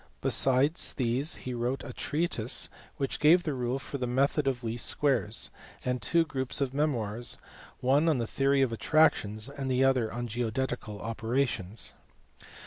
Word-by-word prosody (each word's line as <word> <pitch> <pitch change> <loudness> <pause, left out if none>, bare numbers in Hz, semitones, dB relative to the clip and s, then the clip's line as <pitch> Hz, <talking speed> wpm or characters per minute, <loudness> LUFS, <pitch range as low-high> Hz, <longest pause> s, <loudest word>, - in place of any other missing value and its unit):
Besides 135 +5 +3
these 130 +5 +1
he 130 - -6
wrote 120 +3 -2
a - - -8
treatise 150 -7 +1 0.3
which 135 -2 -2
gave 165 +4 +5
the 155 - -2
rule 125 0 -2
for 135 +1 -6
the 125 - -2
method 135 +3 +1
of 130 -2 -1
least 115 0 0
squares, 120 -7 +2 0.3
and 125 -1 -1
two 165 +10 +2
groups 130 -4 -3
of 135 -2 -1
memoirs, 120 -6 0 0.4
one 140 +6 +3
on 155 - +2
the 120 - -1
theory 135 +3 +2
of 120 -3 -1
attractions, 115 -6 +2
and 140 -1 -5
the 130 0 +2
other 130 -4 +2
on 120 +1 -4
geodetical 120 -1 -3
operations. 115 -3 -1
130 Hz, 155 wpm, -29 LUFS, 120-140 Hz, 0.4 s, gave